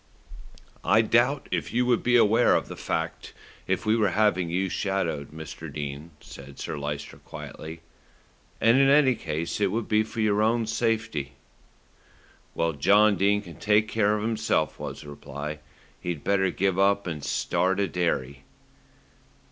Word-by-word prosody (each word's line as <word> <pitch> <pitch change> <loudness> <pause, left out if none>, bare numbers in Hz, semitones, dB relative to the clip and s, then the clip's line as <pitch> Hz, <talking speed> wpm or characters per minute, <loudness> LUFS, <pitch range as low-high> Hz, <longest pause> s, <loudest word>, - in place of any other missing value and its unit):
"I 110 +3 +4
doubt 120 +5 +2
if - - -2
you 125 +1 +1
would 120 -1 +2
be 125 0 +2
aware 115 -1 +5
of - - -1
the - - -6
fact 80 0 -4 0.3
if 95 +4 -1
we 110 +1 +3
were 105 -3 +2
having 95 -3 +1
you 95 +3 0
shadowed, 90 -6 -2
Mr. 80 -1 -9
Dene," 75 +1 -6
said 70 0 -12
Sir - - -5
Lyster 75 0 -5
quietly, 80 +1 -9 0.8
"and 115 +4 +5
in 135 0 +5
any 140 -2 +5
case 85 -4 -4
it 100 - +3
would 115 +1 -2
be 110 0 +3
for 110 +1 -6
your 105 -1 +2
own 115 +1 +2
safety." 110 - -1 1.2
"When 80 -3 -1
John 105 +6 +5
Dene 100 +2 +2
can't 85 -5 -12
take 105 +1 +3
care 105 -1 +2
of 105 - -3
himself," 110 -9 0
was - - -6
the 75 - -11
reply, 75 +1 -7 0.4
"he'd 85 -5 -4
better 95 -1 +2
give 95 0 0
up 100 +1 +3
and 80 -5 -5
start 95 +6 0
a 100 - +1
dairy." 75 -6 -2
100 Hz, 160 wpm, -26 LUFS, 80-110 Hz, 1.2 s, aware